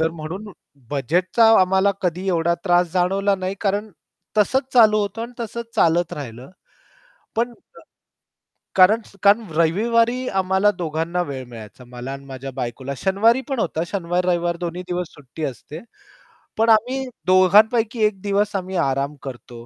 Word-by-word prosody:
तर 160 0 +2
म्हणून 170 +6 -7 0.4
बजेटचा 175 - +2
आम्हाला 190 +2 +3
कधी 180 +1 -2
एवढा 170 -1 +1
त्रास 175 -1 +3
जाणवला 195 +2 +1
नाही, 185 0 -3
कारण 205 +1 -1 0.5
तसंच 265 +5 +1
चालू 215 -3 +6
होतं 205 +2 -3
आणि 235 +1 -7
तसचं 235 +1 -4
चालत 170 +1 +2
राहिलं. 125 -1 -8 0.9
पण 240 +2 0 0.2
क - - -14 1.0
कारण 195 +4 +6 0.2
कारण 210 +3 +4
रविवारी 230 +9 +2
आम्हाला 190 +1 +2
दोघांना 170 +1 -2
वेळ 135 -5 -6
मिळायचा 115 +1 -12
मला 125 +2 -7
आणि 140 0 -8
माझ्या 135 0 -7
बायकोला 130 +2 -5
शनिवारी 215 - +2
पण 270 -3 -2
होता. 160 -4 -1
शनिवार-रविवार 175 -1 -1
दोन्ही 175 +1 -5
दिवस 180 -1 -2
सुट्टी 145 +2 -8
असते. 145 +3 -7 0.8
पण 225 +1 +3
आम्ही 250 +5 +2 0.2
दोघांपैकी 215 +5 +4
एक 205 -3 -1
दिवस 205 +1 0
आम्ही 190 0 -3
आराम 140 -2 0
करतो 120 -3 -9
185 Hz, 140 wpm, -21 LUFS, 160-210 Hz, 1.0 s, चालू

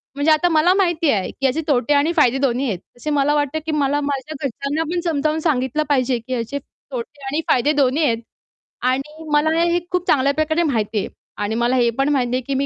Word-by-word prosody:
म्हणजे 285 +3 +2
आता 310 +3 +3
मला 325 +3 +4
माहिती 345 -5 +1
आहे, 195 -3 0
की 270 - -4
याचे 270 +5 +1
तोटे 270 0 +2
आणि 290 +3 +3
फायदे 270 -6 +3
दोन्ही 270 -1 0
आहेत. 195 -6 -2 0.2
तसे 300 - -5
मला 290 0 +2
वाटते, 290 +1 0
की 315 0 -5
मला 290 -1 +1
माझ्या 280 +1 -3
घरच्यांना 280 +4 -2
पण 355 - 0
समजावून 310 -1 0
सांगितलं 300 -2 0
पाहिजे, 255 -3 +2
की 245 +3 -6
याचे 245 +3 -3
तोटे 440 - -10
आणि 290 +4 -1
फायदे 270 +4 +3
दोन्ही 285 +2 +2
आहेत. 230 -3 +2 0.6
आणि 275 +5 -2
मला 295 +1 +3
हे 345 0 +2
खूप 360 0 -1
चांगल्या 280 0 +3
प्रकारे 315 +3 +1
माहिती 225 -7 -1
आहे - - -3 0.4
आणि 215 +2 -2
मला 240 +2 +1
हे 240 -2 +3
पण 275 - +2
माहिती 255 -4 +1
आहे, 255 - 0
की 275 - -1
मी 275 - 0
285 Hz, 220 wpm, -20 LUFS, 255-310 Hz, 0.6 s, मला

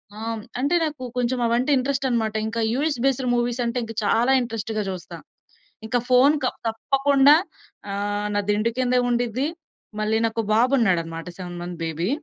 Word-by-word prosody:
ఆ! - - -11 0.2
హ్మ్. 220 - -5 0.2
అంటే 285 +7 +1
నాకు 300 -4 -3
కొంచెం 250 +1 0
అవంటే 240 +5 +1
ఇంట్రెస్ట్ 270 +1 -1
అన్నమాట. 220 -3 0
ఇంకా 230 +1 -3
యూఎస్ 290 0 0
బేస్డ్ 265 -1 +1
మూవీస్ 240 0 0
అంటే 235 +1 -1 0.2
చాలా 230 +5 +2
ఇంట్రెస్ట్‌గా 225 -2 -3
జూస్తా. 185 -2 -7 0.7
ఇంకా 245 +3 +1
ఫోను 260 +4 +5
క - - +1 0.2
తప్పకుండా 275 +5 +4 0.6
ఆహ్, 205 +1 -2
నా 205 - +2
దిండు 215 +2 +1
కిందే 250 0 +2
ఉండిద్ది. 245 +2 0 0.5
మళ్ళీ 215 +1 +1
నాకో 225 0 -2
బాబున్నాడన్నమాట. 185 -10 +1
7 175 -1 -7
మంత్స్ 175 -1 -7
బేబీ. 165 +3 -2
235 Hz, 150 wpm, -23 LUFS, 210-255 Hz, 0.7 s, ఫోను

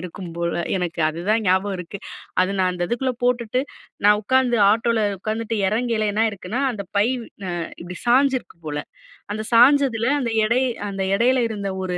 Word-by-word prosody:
இருக்கும் 180 0 -8
போல, 170 0 -1 0.2
எனக்கு 175 -2 -3
அதுதான் 190 +8 0
ஞாபகம் 190 +2 +2
இருக்கு. 180 +3 -7 0.4
அது 185 +1 +2
நான் 185 -1 +2
அந்த 175 -1 -2
இதுக்குள்ள 255 +2 -1
போட்டுட்டு 245 0 +1 0.4
நான் 210 0 +6
உக்காந்து 255 +2 +2
ஆட்டோல 225 +1 +1 0.2
உக்காந்துட்டு, 220 +2 -3
எறங்கேல 220 0 0
என்ன 215 - +1
ஆயிருக்குன்னா. 215 +2 -3
அந்த 215 -5 -5
பை 205 +2 +4 0.4
அ - - -2 0.3
இப்டி 180 +1 -8
சாஞ்சிருக்கு 260 -3 +2
போல. 150 -1 -3 0.6
அந்த 215 - -3
சாய்ஞ்சதுல 245 -1 +5
அந்த 235 -4 -2
எடை 235 +4 +2 0.3
அந்த 195 -1 -4
எடையில 245 +3 +3
இருந்த 200 -3 -4
ஒரு 180 -1 -2
215 Hz, 160 wpm, -22 LUFS, 185-240 Hz, 0.6 s, நான்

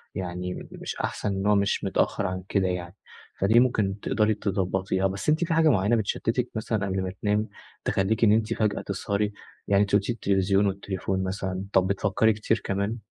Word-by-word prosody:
يعني 90 0 -4
مش - - -6
أحسن، - - -2
إن 95 +1 -2
هو 105 - +5
مش 100 0 +1
متأخر 100 - 0
عن 95 0 -4
كده 95 -2 +2
يعني، 90 +1 -4 0.4
فدي 110 +5 +5
ممكن 105 -6 +1
تقدري 110 +1 +1
تضبّطيها. 95 -1 0
بس 100 +8 -3
أنتِ 155 +3 +3
في 165 - -1
حاجة 160 -1 +4
معيّنة 105 -1 +3
بتشتتِك 110 -3 -1
مثلًا 110 -2 -1
قبل 95 -1 -1
ما 90 - -3
تنامي، 105 +1 +1 0.4
تخلّيكِ 100 +4 +1
إن 105 - +6
أنتِ 110 +1 +2
فجأة 105 -3 0
تسهري، 100 +2 -2 0.3
يعني 100 0 +4
أنت 100 0 0
قُلتِ 105 - +3
لي - - +2
التلفزيون 100 -2 +2
والتليفون 95 -1 -2
مثلًا، 95 0 -3
طب 95 0 +4
بتفكري 100 +3 +2
كتير 110 +1 -1
كمان؟ 100 +3 -1
100 Hz, 185 wpm, -26 LUFS, 95-110 Hz, 0.4 s, إن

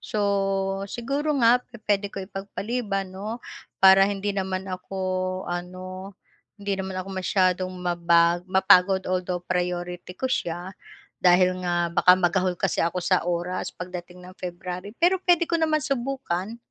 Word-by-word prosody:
So, 195 -1 -1
siguro 280 +7 -1
nga 245 +2 +6
pu-puwede 210 -4 -2
ko 195 -1 -6
ipagpaliban 195 0 -4
'no, 210 +4 -5 0.4
para 195 0 +7
hindi 205 0 -2
naman 190 -1 -2
ako 185 0 -7 0.5
ano, 185 +2 -6 0.4
hindi 200 -1 -3
naman 190 0 -5
ako 185 +1 -4
masyadong 185 0 +1
mabag 175 -1 +2
mapagod 190 0 +5
although, 180 -1 -2
priority 180 0 -3
ko - - -6
siya 175 -7 -2 0.5
dahil 185 0 +4
nga 175 -1 0
baka 180 +1 +6
magahol 180 0 +1
kasi - - 0
ako 175 +1 -1
sa 185 - +3
oras 175 +1 -2
pagdating 180 0 -8
ng 185 - -11
February, 180 +3 -6
pero 360 +2 +3
puwede 350 -2 +3
ko 335 0 -1
naman 310 -2 +1
subukan. 240 -6 -2
185 Hz, 135 wpm, -25 LUFS, 180-205 Hz, 0.5 s, para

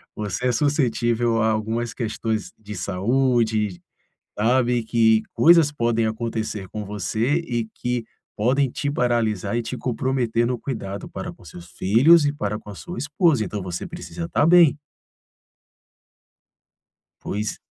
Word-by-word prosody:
você 105 +4 -2
é - - +3
suscetível 120 -4 +1
a 110 - +3
algumas 110 +2 -2
questões 110 -2 -3
de 105 -1 -8
saúde, 110 0 0 0.6
sabe, 120 +2 +2
que 110 -1 +3
coisas 165 -3 +6
podem 115 -5 0
acontecer 110 -3 -3
com 105 -1 -6
você 105 - -1
e 120 -9 -2
que 125 -1 -1 0.3
podem 130 +5 +2
te 140 +3 -3
paralisar 120 -5 0
e 120 - 0
te 125 - -5
comprometer 125 -2 0
no 125 -1 -2
cuidado 105 -6 -5
para - - -6
com - - -20
os - - -12
seus 85 0 -11
filhos 145 - +5
e 145 - +1
para 105 -7 -3
com 105 - -12
a 100 - -8
sua 175 - -8
esposa, 145 -4 +2
então 100 0 -5
você 90 -1 -5
precisa 170 -1 -7
tá 145 - +2
bem. 165 -2 +6 2.4
Pois. 105 +1 -4
115 Hz, 140 wpm, -23 LUFS, 110-130 Hz, 2.4 s, coisas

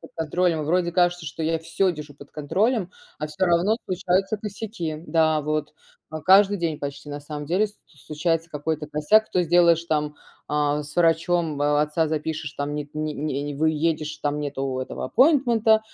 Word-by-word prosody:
под - - -13
контролем. 165 0 0
Вроде 175 +2 +1
кажется, 175 -1 +2
что 160 +2 -6
я 165 +1 +1
всё 185 +3 0
держу 150 -2 -9
под 145 0 -14
контролем, 190 - 0 0.3
а 150 - -3
всё 155 +5 -1
равно 175 +5 +3
случаются 190 +2 0
косяки. 205 -6 -5
Да, 160 -2 +2
вот, 150 0 -2 0.4
а, 155 0 -5
каждый 195 +3 +5
день 160 -3 -2
почти, 140 +1 -6
на 145 0 -5
самом 150 0 -7
деле, 195 +6 +1
ст 205 - -21
случается 160 +3 -3
какой-то 150 0 -3
косяк. 155 +9 +2
То 180 - +2
сделаешь 170 0 +4
там, 150 -2 -1 0.3
а, 150 0 0
с 145 - -11
врачом, 170 0 +2
м, 145 - -3
а, 145 0 +3
отца 150 +2 +1
запишешь, 155 -1 -3
там 145 +1 -4
нет 150 -1 -4
ни 155 0 -3
не 145 -1 -3
выедешь, 155 0 0
там 145 0 -1
нету 135 -2 -3
этого 130 - -5
аппойнтмента, 235 - +4
160 Hz, 175 wpm, -24 LUFS, 150-180 Hz, 0.4 s, каждый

